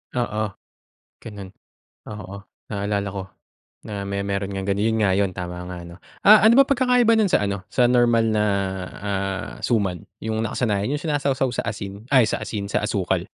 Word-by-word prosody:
Oo 115 -3 -1 0.8
ganun. 100 -3 -8 0.6
Oo 100 -2 -8 0.3
naalala 100 -1 -2
ko, 100 -1 -4 0.6
na 105 -2 -5
may, 100 0 -2
meron 100 0 -2
ng 95 0 -3
ganun, 100 +1 0
yun 110 0 +1
nga 100 -2 +3
yun 100 0 +1
tama 90 -1 -5
nga 90 - -6
ano. 85 - -11 0.3
Ah, 215 +1 +9
ano 225 - +7
ba - - +4
pagkakaiba 250 -3 +3
nun 215 -3 +3
sa - - +3
ano 100 -1 -3
sa 125 - +3
normal 120 -2 +4
na, 105 -1 +2 0.6
ah, 100 0 -3
suman? 100 -7 0 0.2
Yung 110 0 -2
nakasanayan 110 +1 -1
yung 150 - -2
sinasawsaw 140 -4 0
sa - - -2
asin. 100 -1 -6
Ay 130 -3 +7
sa - - -2
asin, 100 -2 -4
sa - - 0
asukal. - - -1
105 Hz, 175 wpm, -23 LUFS, 100-125 Hz, 0.8 s, Ah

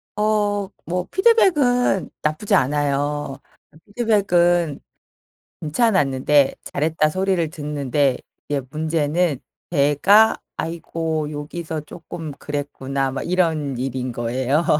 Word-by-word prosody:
어 205 -2 +1 0.2
뭐 180 +1 -2
피드백은 295 - +3
나쁘지 175 +7 0
않아요. 145 -1 0 0.3
아 155 - -19
피드백은 175 - +2 0.8
괜찮았는데 150 - +2
"잘했다." 155 +1 0
소리를 185 -1 0
듣는데 145 -3 0 0.3
이게 145 -1 0
문제는 155 0 0 0.3
제가 175 +9 +4 0.2
"아이고. 160 -2 -3
요기서 155 +1 -5
쪼끔 160 -1 -8
그랬구나." 140 -1 -3
막 135 - -3
이런 160 -7 0
일인 130 0 -3
거예요. 130 +7 0
155 Hz, 235 characters per minute, -21 LUFS, 145-185 Hz, 0.8 s, 제가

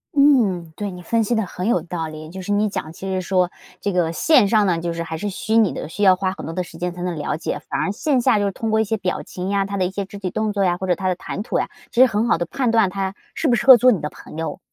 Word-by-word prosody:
嗯， 210 - +3
对， 205 -1 -4
你 180 -1 -9
分 230 +4 +1
析 235 +3 0
得 220 -3 0
很 180 +3 -5
有 180 -8 +2
道 165 -1 -4
理， 155 0 -9
就 190 +2 -8
是 205 - -4
你 210 +1 +2
讲 160 -5 -4
其 190 +4 -8
实 185 -1 -1
说 180 -1 +1 0.3
这 200 - -1
个 170 -2 +1
线 245 - +4
上 210 0 +3
呢， 170 -3 +1
就 170 0 -3
是 170 0 -3
还 160 -1 -5
是 205 +4 -3
虚 220 +3 -2
拟 220 -4 +4
的， - - -5
需 205 - -7
要 190 -2 +6
花 185 0 -1
很 - - -8
多 165 - -5
的 180 - -2
时 165 -1 -12
间 180 0 -2
才 180 0 -7
能 180 -2 -2
了 150 0 -2
解， - - -3
反 - - -1
而 195 - 0
线 265 +4 0
下 235 -4 +3
就 205 - +1
是 200 - 0
通 220 +2 -3
过 220 - +3
一 - - +3
些 220 +1 -1
表 185 -3 -2
情 185 +1 -6
呀， 200 -1 +1
他 200 0 -4
的 185 - +1
一 185 - -2
些 200 0 -3
肢 200 +1 -10
体 185 -3 -4
动 215 0 -1
作 200 -1 0
呀， 175 -1 +2
或 190 - -4
者 180 - +3
他 185 +2 -3
的 180 - +1
谈 200 - -5
吐 - - -1
呀， - - -2 0.2
其 245 - +3
实 260 - +8
很 220 +2 0
好 - - +3
地 175 - -1
判 245 +4 0
断 225 -5 +4
他 195 0 -3 0.2
适 320 - 0
不 245 - +4
适 240 - -3
合 260 -2 +11
做 255 +2 +5
你 195 - +1
的 150 - -3
朋 - - -13
友。 165 0 -4
195 Hz, 355 characters per minute, -21 LUFS, 180-215 Hz, 0.3 s, 合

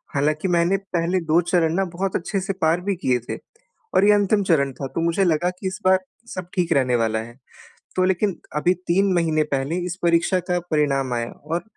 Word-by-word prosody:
हालाँकि 150 +5 +1
मैंने 175 +3 +3 0.2
पहले 170 +2 +1
2 170 - +6
चरण 165 -2 +2
न - - +1
बहुत 190 +1 -2
अच्छे 195 +3 -3
से 195 +1 -2
पार 165 +2 +2
भी 200 0 -1
किए 125 -1 +2
थे - - -3 0.6
और 195 - +5
ये 210 - +6
अंतिम 205 0 +2
चरण 140 -7 +2
था, 135 +2 -5
तो 165 - -4
मुझे 170 +4 +1
लगा 175 +1 +2
कि 190 - -3
इस 190 +2 -5
बार 185 0 +5 0.4
सब 185 -1 -5
ठीक 175 -2 +1
रहने 125 -3 +2
वाला 110 0 0
है 120 +2 -9 0.6
तो 185 - +2
लेकिन 190 +1 0 0.2
अभी 175 +4 +3
3 190 +2 +3
महीने 160 -2 +2
पहले 140 +6 -2
इस 180 0 -3
परीक्षा 170 +2 +3
का 175 - +2
परिणाम 135 -4 +1
आया 115 0 -3
और 165 +4 -4
170 Hz, 210 wpm, -22 LUFS, 150-185 Hz, 0.6 s, 2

